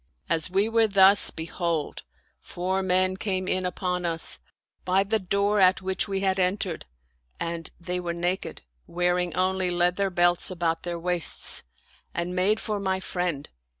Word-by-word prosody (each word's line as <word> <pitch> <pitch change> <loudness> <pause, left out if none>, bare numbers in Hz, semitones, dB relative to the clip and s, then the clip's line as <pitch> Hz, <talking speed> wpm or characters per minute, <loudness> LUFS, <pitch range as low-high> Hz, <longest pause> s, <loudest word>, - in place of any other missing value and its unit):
As 160 +1 0
we 195 +3 +1
were 225 0 +3
thus, 195 0 +6
behold, 165 -1 -3 0.4
four 185 +2 -3
men 185 0 +2
came 185 -2 -2
in 185 -1 0
upon 180 0 -3
us, 165 - +3 0.4
by 185 +2 +2
the 220 +2 -1
door 200 +2 0
at 190 0 +4
which 190 +2 -1
we 195 -1 -2
had 190 -1 0
entered, 185 -2 -1 0.5
and 170 -1 -4
they 180 +1 -4
were 175 -1 -3
naked, 175 +2 -3 0.2
wearing 180 0 0
only 185 0 +1
leather 180 +3 +1
belts 175 -1 +2
about 170 -3 -2
their 175 -1 -4
waists, 175 0 +2 0.5
and 175 +1 -3
made 200 +4 +2
for 210 -2 -3
my 190 -1 -1
friend. 180 -6 -3
180 Hz, 150 wpm, -25 LUFS, 175-190 Hz, 0.5 s, thus